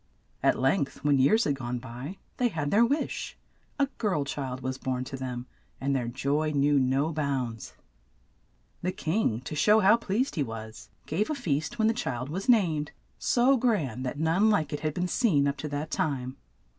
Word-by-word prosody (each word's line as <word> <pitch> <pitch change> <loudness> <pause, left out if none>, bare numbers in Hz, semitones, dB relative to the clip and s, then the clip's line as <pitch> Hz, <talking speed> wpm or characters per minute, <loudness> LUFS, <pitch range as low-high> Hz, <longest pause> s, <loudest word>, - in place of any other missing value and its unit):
At - - +3
length, 135 +3 0
when 145 -2 +3
years 215 - +5
had 145 - +1
gone 125 -2 -4
by, 125 +9 -7 0.2
they 250 - +3
had 155 -9 -2
their 220 +3 +5
wish 280 +6 -1 0.2
— - - -40 0.2
a 280 - +5
girl 190 -10 +1
child 130 -2 -4
was 130 +1 -3
born 130 -1 -2
to 135 - -6
them, 125 -2 -5 0.3
and 140 +1 0
their 125 -3 -1
joy 140 +5 0
knew 145 -1 +3
no 135 +5 +1
bounds. 130 -7 -3 1.1
The 180 +1 -1
king 160 - 0
to 130 - -7
show 210 +7 +5
how 210 +2 +6
pleased 235 +4 -1
he 155 - -1
was, 110 -2 -8 0.2
gave 190 +8 -1
a 305 - 0
feast 170 - -2
when 220 -1 +3
the 225 - +3
child 135 - -3
was 190 - -4
named, 165 -11 +3 0.3
so 255 +3 +3
grand 160 - 0
that 130 +2 -3
none 165 +8 +3
like 160 -8 +1
it 145 - -2
had 155 0 -2
been 180 0 0
seen 175 - +2
up 140 0 -1
to 145 +2 -4
that 145 +2 -4
time. 130 -4 -1
145 Hz, 195 wpm, -28 LUFS, 130-195 Hz, 1.1 s, how